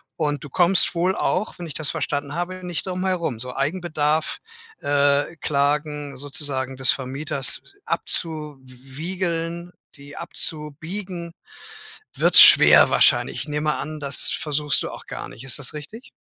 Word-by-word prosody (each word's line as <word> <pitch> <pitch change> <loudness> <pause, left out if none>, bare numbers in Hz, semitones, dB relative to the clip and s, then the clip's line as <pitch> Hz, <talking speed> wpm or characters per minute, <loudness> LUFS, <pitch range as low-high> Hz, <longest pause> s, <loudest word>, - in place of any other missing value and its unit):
Und 150 -2 -3
du 145 - -9
kommst 180 +5 +3
wohl 180 +3 0
auch 195 +4 -2
wenn 175 - -6
ich 155 - -8
das 155 -3 +2
verstanden 145 -2 -4
habe 180 +1 -5
nicht 175 -4 -4
drum 185 +1 -4
herum. 170 -10 -2
So 125 +1 -6
Eigenbedarf 155 0 -2 0.4
äh, 145 +2 +1
Klagen 145 0 -2
sozusagen 135 -2 -2
des 130 -1 +2
Vermieters 135 0 +2 0.2
abzuwiegeln 165 +4 -4 0.2
die 145 0 -14
abzubiegen, 170 +3 -2 0.8
wird - - +3
schwer - - +8
wahrscheinlich. - - +2
Ich - - -8
nehme 150 0 -2
an, 155 +2 -6
das 140 -2 +1
versuchst 150 -1 0
du - - -6
auch - - -12
gar - - -7
nicht. 120 - -13
Ist 135 - +3
das 145 -4 -3
richtig? 155 - -11
150 Hz, 140 wpm, -22 LUFS, 140-170 Hz, 0.8 s, schwer